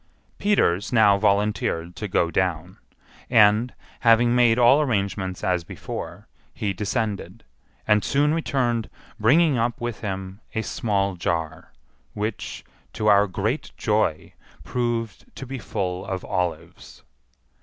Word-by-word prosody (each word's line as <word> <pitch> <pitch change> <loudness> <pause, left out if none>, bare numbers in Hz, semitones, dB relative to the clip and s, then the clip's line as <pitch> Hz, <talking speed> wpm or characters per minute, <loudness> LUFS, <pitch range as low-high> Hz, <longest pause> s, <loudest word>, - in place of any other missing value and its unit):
Peters 100 - +1
now 105 -4 +5
volunteered 100 -4 0
to 105 - -4
go 85 -3 +1
down; 90 0 -2 0.5
and, 110 +1 +4 0.3
having 120 0 +4
made 120 -2 +4
all 125 +4 +6
arrangements 100 -7 -2
as 90 -2 0
before, - - -7 0.3
he 100 -2 -2
descended, 105 0 -3 0.4
and 105 0 +3
soon 145 +2 +2
returned 125 -8 -1 0.3
bringing 140 +5 +4
up 115 +1 -1
with 120 -2 -4
him 95 -1 -5
a 110 - 0
small 100 -4 -1
jar, 85 -2 -3 0.4
which, 105 +1 -4 0.3
to 110 - -4
our 105 -1 +5
great 105 +9 -2
joy, 105 -9 0 0.3
proved 115 -1 -3
to 135 - -7
be 135 0 -6
full 95 -4 -3
of 95 -1 -4
olives. 85 -7 -4
105 Hz, 125 wpm, -24 LUFS, 95-120 Hz, 0.5 s, all